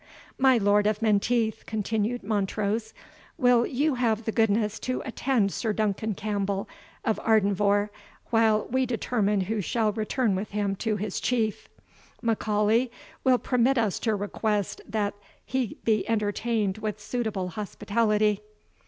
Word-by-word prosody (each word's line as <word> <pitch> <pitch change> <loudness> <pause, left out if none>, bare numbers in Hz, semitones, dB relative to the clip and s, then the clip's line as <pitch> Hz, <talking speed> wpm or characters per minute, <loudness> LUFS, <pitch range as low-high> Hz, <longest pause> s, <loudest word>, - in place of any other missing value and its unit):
"My 265 -1 +5
Lord 205 -1 +3
of 215 +1 0
Menteith," 220 +1 +1
continued 220 +2 -1
Montrose, 210 +1 -1 0.5
"will 245 -4 +4
you 285 +3 +1
have 230 -3 0
the 225 - 0
goodness 215 -1 +1
to 255 - -3
attend 245 -5 +1
Sir 220 +1 -1
Duncan 215 0 -1
Campbell 200 -1 -2 0.4
of 220 - +1
Ardenvohr, 205 -1 +2 0.4
while 220 -2 +3
we 260 0 +2
determine 215 -4 0
who 210 +3 -1
shall 220 +3 +1
return 220 +1 0
with 195 +2 -3
him 200 -1 -1
to 220 0 -1
his 205 -1 -3
Chief? 225 -4 -1 0.5
M'Aulay 220 +1 +2 0.3
will 255 -1 +5
permit 250 +2 +2
us 220 -5 +1
to 220 -2 0
request 205 0 -2
that 205 -1 0 0.3
he 260 -4 -2
be 220 -1 +1
entertained 215 -1 0
with 215 -1 -3
suitable 210 -5 -2
hospitality." 210 +1 0
215 Hz, 135 wpm, -27 LUFS, 205-230 Hz, 0.5 s, My